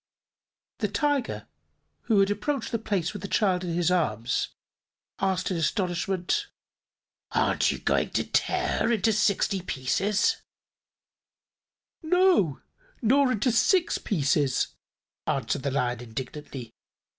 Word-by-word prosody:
The -, -, +1 dB
Tiger, 290 Hz, -4 st, -1 dB, 0.6 s
who 210 Hz, -4 st, +4 dB
had 195 Hz, +1 st, +2 dB
approached 250 Hz, +5 st, -2 dB
the 230 Hz, -, 0 dB
place 195 Hz, -5 st, -1 dB
with 205 Hz, -, -7 dB
the 200 Hz, -, -4 dB
child 190 Hz, -4 st, +1 dB
in 170 Hz, -1 st, -2 dB
its 175 Hz, 0 st, +2 dB
arms, 120 Hz, -10 st, 0 dB, 0.7 s
asked 190 Hz, -1 st, 0 dB
in 180 Hz, -, -1 dB
astonishment: 180 Hz, -, 0 dB, 0.9 s
"Aren't -, -, +2 dB
you -, -, -4 dB
going -, -, +1 dB
to -, -, +1 dB
tear -, -, 0 dB
her -, -, +2 dB
into 220 Hz, -1 st, +2 dB
sixty 200 Hz, -2 st, +1 dB
pieces?" 185 Hz, +7 st, 0 dB, 1.6 s
"No, 335 Hz, -, +3 dB, 0.4 s
nor 265 Hz, +3 st, +4 dB
into 220 Hz, +4 st, +1 dB
six 335 Hz, -, +3 dB
pieces," 145 Hz, -6 st, +1 dB, 0.6 s
answered -, -, -1 dB
the 140 Hz, -, -1 dB
Lion 125 Hz, -3 st, -1 dB
indignantly. 125 Hz, +1 st, -7 dB
190 Hz, 120 wpm, -27 LUFS, 150-225 Hz, 1.6 s, who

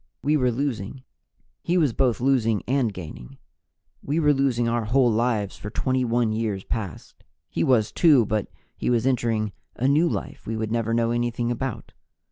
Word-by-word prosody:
We 150 Hz, +2 st, +2 dB
were 125 Hz, -4 st, +2 dB
losing; 130 Hz, -1 st, -3 dB, 0.6 s
he 175 Hz, +2 st, 0 dB
was 150 Hz, -8 st, +2 dB
both 125 Hz, -2 st, +1 dB
losing 120 Hz, -5 st, +2 dB
and 130 Hz, -3 st, +1 dB
gaining. 70 Hz, -8 st, -9 dB, 0.6 s
We 150 Hz, +4 st, -1 dB
were 150 Hz, -2 st, +4 dB
losing 130 Hz, -4 st, +1 dB
our 115 Hz, -1 st, 0 dB
whole 120 Hz, +2 st, +3 dB
lives 110 Hz, -3 st, 0 dB
for 105 Hz, -, -7 dB
21 120 Hz, -1 st, 0 dB
years 110 Hz, -3 st, -2 dB
past; 100 Hz, -9 st, -6 dB, 0.3 s
he 85 Hz, -, 0 dB
was, 110 Hz, -2 st, +3 dB
too, 145 Hz, -9 st, +5 dB
but 105 Hz, -1 st, -1 dB, 0.3 s
he -, -, -2 dB
was 120 Hz, -1 st, +2 dB
entering 115 Hz, -5 st, 0 dB, 0.2 s
a 130 Hz, -, 0 dB
new 155 Hz, +5 st, +3 dB
life -, -, -5 dB
we 115 Hz, -, -2 dB
would 110 Hz, -1 st, -3 dB
never 115 Hz, 0 st, 0 dB
know 115 Hz, 0 st, +1 dB
anything 120 Hz, 0 st, -1 dB
about. 125 Hz, 0 st, -4 dB
120 Hz, 170 wpm, -24 LUFS, 110-130 Hz, 0.6 s, too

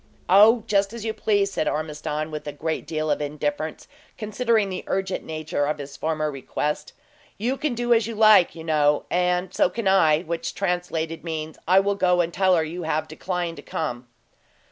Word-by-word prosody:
"Oh, 215 Hz, +5 st, +6 dB
just 200 Hz, 0 st, +1 dB
as 230 Hz, -2 st, -6 dB
you 220 Hz, -, -1 dB
please," 205 Hz, -2 st, +1 dB
said 155 Hz, -, -1 dB
Ormiston, 155 Hz, 0 st, -3 dB
with 150 Hz, -1 st, -6 dB
a -, -, -2 dB
great 155 Hz, +2 st, -4 dB
deal 155 Hz, -1 st, -1 dB
of 145 Hz, -, 0 dB
indifference, 150 Hz, +1 st, -3 dB, 0.3 s
considering 220 Hz, -1 st, 0 dB
the 185 Hz, -, -5 dB
urgent 190 Hz, 0 st, -2 dB
nature 155 Hz, -2 st, -2 dB
of 150 Hz, -, -1 dB
his 140 Hz, -1 st, -8 dB
former 155 Hz, -1 st, -1 dB
request. 150 Hz, +2 st, -3 dB, 0.4 s
"You 240 Hz, +6 st, -1 dB
can 280 Hz, -2 st, -2 dB
do 240 Hz, 0 st, +2 dB
as 225 Hz, -1 st, +2 dB
you 230 Hz, -, -5 dB
like, 215 Hz, -4 st, +6 dB
you 165 Hz, -, -8 dB
know, 150 Hz, -2 st, +2 dB
and 180 Hz, +1 st, +1 dB
so -, -, +3 dB
can 220 Hz, +2 st, -3 dB
I 160 Hz, -5 st, +4 dB
which 165 Hz, 0 st, -4 dB
translated, 175 Hz, -3 st, -2 dB
means, 160 Hz, -2 st, -5 dB
I 185 Hz, +2 st, +6 dB
will 200 Hz, +1 st, +1 dB
go 180 Hz, -2 st, +2 dB
and 170 Hz, -1 st, 0 dB
tell 185 Hz, -1 st, +3 dB
her 165 Hz, -, +2 dB
you 165 Hz, +3 st, -5 dB
have 155 Hz, -1 st, -1 dB
declined 175 Hz, +1 st, -4 dB
to -, -, -8 dB
come." 125 Hz, -5 st, -4 dB
170 Hz, 190 wpm, -24 LUFS, 155-195 Hz, 0.4 s, Oh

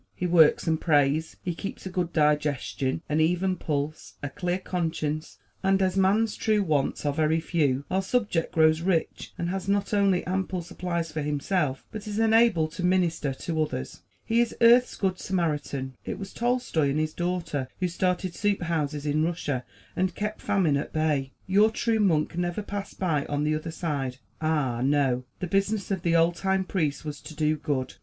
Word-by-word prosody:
He 180 Hz, -, -3 dB
works 170 Hz, -3 st, +5 dB
and 160 Hz, -1 st, +1 dB
prays. 150 Hz, 0 st, +2 dB
He 175 Hz, -, -2 dB
keeps 195 Hz, +4 st, -7 dB
a 190 Hz, -, -5 dB
good 180 Hz, -2 st, -1 dB
digestion, 150 Hz, -1 st, 0 dB
an 150 Hz, +1 st, 0 dB
even 180 Hz, +3 st, +2 dB
pulse, 150 Hz, -2 st, -3 dB
a 145 Hz, -, -2 dB
clear 180 Hz, +5 st, -1 dB
conscience; 160 Hz, -4 st, -3 dB, 0.2 s
and 195 Hz, 0 st, +3 dB
as 190 Hz, -1 st, +1 dB
man's 205 Hz, +3 st, +3 dB
true 215 Hz, -2 st, +1 dB
wants 150 Hz, -4 st, 0 dB
are 145 Hz, -, +1 dB
very 155 Hz, +2 st, +2 dB
few, 145 Hz, -5 st, 0 dB
our 190 Hz, +1 st, +2 dB
subject 195 Hz, -5 st, 0 dB
grows 160 Hz, 0 st, +4 dB
rich 170 Hz, -2 st, -1 dB
and 170 Hz, -, -2 dB
has 190 Hz, +1 st, -3 dB
not 200 Hz, +1 st, 0 dB
only 195 Hz, -3 st, +3 dB
ample 185 Hz, -1 st, -2 dB
supplies 170 Hz, -2 st, -3 dB
for 155 Hz, 0 st, -3 dB
himself, 145 Hz, 0 st, -1 dB
but 215 Hz, 0 st, -7 dB
is 210 Hz, 0 st, -4 dB
enabled 225 Hz, -8 st, +4 dB
to 175 Hz, -, -6 dB
minister 175 Hz, -5 st, +1 dB
to 160 Hz, +4 st, -2 dB
others. 65 Hz, -, -4 dB, 0.2 s
He 230 Hz, +1 st, +3 dB
is 235 Hz, -, -1 dB
earth's 240 Hz, +2 st, +6 dB
good 185 Hz, -2 st, -1 dB
Samaritan. 150 Hz, -7 st, -2 dB
It -, -, -4 dB
was 195 Hz, -1 st, -8 dB
Tolstoy 240 Hz, -, +1 dB
and 145 Hz, +2 st, 0 dB
his 155 Hz, 0 st, -1 dB
daughter 175 Hz, -6 st, -2 dB
who 185 Hz, -, +1 dB
started 180 Hz, +1 st, -1 dB
soup 205 Hz, -2 st, 0 dB
houses 150 Hz, -3 st, -2 dB
in 150 Hz, +1 st, +1 dB
Russia 155 Hz, -6 st, -2 dB, 0.3 s
and 185 Hz, 0 st, 0 dB
kept 210 Hz, +1 st, -3 dB
famine 170 Hz, -8 st, +2 dB
at 140 Hz, -, -4 dB
bay. 150 Hz, -4 st, 0 dB
Your 205 Hz, +3 st, +4 dB
true 225 Hz, 0 st, 0 dB
monk 170 Hz, -6 st, +2 dB
never 175 Hz, +3 st, -2 dB
passed 200 Hz, -1 st, -6 dB
by 155 Hz, -7 st, 0 dB
on 145 Hz, 0 st, -1 dB
the 155 Hz, 0 st, +1 dB
other 155 Hz, +2 st, -3 dB
side; 145 Hz, -6 st, -3 dB, 0.2 s
ah, 145 Hz, -7 st, 0 dB
no! 135 Hz, -3 st, +2 dB, 0.2 s
the -, -, 0 dB
business 195 Hz, +3 st, 0 dB
of 190 Hz, -3 st, -1 dB
the 170 Hz, -1 st, +1 dB
old 165 Hz, +1 st, +4 dB
time 190 Hz, +2 st, 0 dB
priest 155 Hz, -6 st, -2 dB
was 150 Hz, -2 st, -5 dB
to 155 Hz, -, -10 dB
do 155 Hz, 0 st, +1 dB
good. 145 Hz, -4 st, -2 dB
170 Hz, 185 wpm, -27 LUFS, 150-190 Hz, 0.3 s, earth's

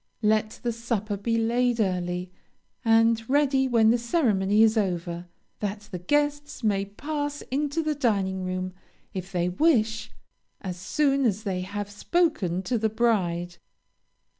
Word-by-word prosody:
Let 215 Hz, 0 st, +1 dB
the 240 Hz, -, 0 dB
supper 225 Hz, -3 st, -2 dB
be 230 Hz, +3 st, -1 dB
laid 240 Hz, +1 st, +1 dB
early, 180 Hz, -2 st, -1 dB, 0.5 s
and 225 Hz, 0 st, +4 dB
ready 270 Hz, -1 st, +3 dB
when 225 Hz, -3 st, +4 dB
the 240 Hz, -, +2 dB
ceremony 220 Hz, -, +2 dB
is 220 Hz, 0 st, +4 dB
over, 175 Hz, -4 st, -2 dB, 0.3 s
that 205 Hz, 0 st, -3 dB
the 180 Hz, -, -4 dB
guests 290 Hz, +6 st, -1 dB
may 200 Hz, -2 st, +1 dB
pass 290 Hz, +7 st, -4 dB
into 290 Hz, +4 st, 0 dB
the 310 Hz, 0 st, 0 dB
dining 200 Hz, -9 st, 0 dB
room, 185 Hz, 0 st, -3 dB, 0.4 s
if 185 Hz, 0 st, -5 dB
they 175 Hz, -1 st, 0 dB
wish, 225 Hz, -, +2 dB, 0.5 s
as 180 Hz, -2 st, -5 dB
soon 275 Hz, +8 st, +1 dB
as 215 Hz, -3 st, +1 dB
they 190 Hz, -4 st, -2 dB
have 200 Hz, +2 st, -4 dB
spoken 205 Hz, -, 0 dB
to 245 Hz, +1 st, 0 dB
the 220 Hz, 0 st, +1 dB
bride. 180 Hz, -7 st, 0 dB
220 Hz, 140 wpm, -26 LUFS, 190-250 Hz, 0.5 s, and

